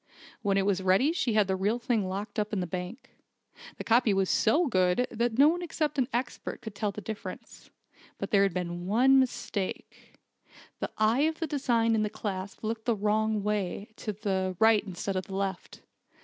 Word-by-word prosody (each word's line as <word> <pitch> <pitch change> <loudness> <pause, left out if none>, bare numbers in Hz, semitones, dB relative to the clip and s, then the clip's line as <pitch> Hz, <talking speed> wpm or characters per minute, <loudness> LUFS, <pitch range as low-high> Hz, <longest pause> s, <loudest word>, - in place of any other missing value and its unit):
When 200 -3 +1
it 195 - +2
was 195 -2 +1
ready 190 +11 +3
she 335 -10 0
had 210 -1 +4
the 190 - +1
real 205 +5 0
thing 230 -5 0
locked 205 +3 -4
up 210 0 -1
in 210 - -1
the 180 - -1
bank. 180 +7 -6 0.7
The - - -5
copy 230 -3 +3
was 190 -1 +1
so 305 +11 +3
good 185 - +2
that 235 0 -1
no 280 +2 +7
one 345 +3 +1
except 310 -4 -2
an 250 - +2
expert 245 0 -3
could 220 - -7
tell 205 0 -2
the 210 - -8
difference. 220 0 -8 0.5
But - - -5
there 200 -3 +5
had 200 -1 +3
been 175 0 -4
one 260 +6 +5
mistake. 220 -6 -3 0.6
The - - -2
eye 225 +7 +3
of 320 - -6
the 330 - 0
design 240 -6 +1
in 220 - +2
the 210 - 0
clasp 200 -2 -5
looked 220 0 -3
the 235 -2 +2
wrong 215 0 0
way 205 -1 -2
to 215 - -4
the 190 -3 -2
right 220 0 +5
instead 195 0 -4
of 185 - -3
the 190 - -6
left. 195 -2 -4
215 Hz, 200 wpm, -29 LUFS, 195-240 Hz, 0.7 s, no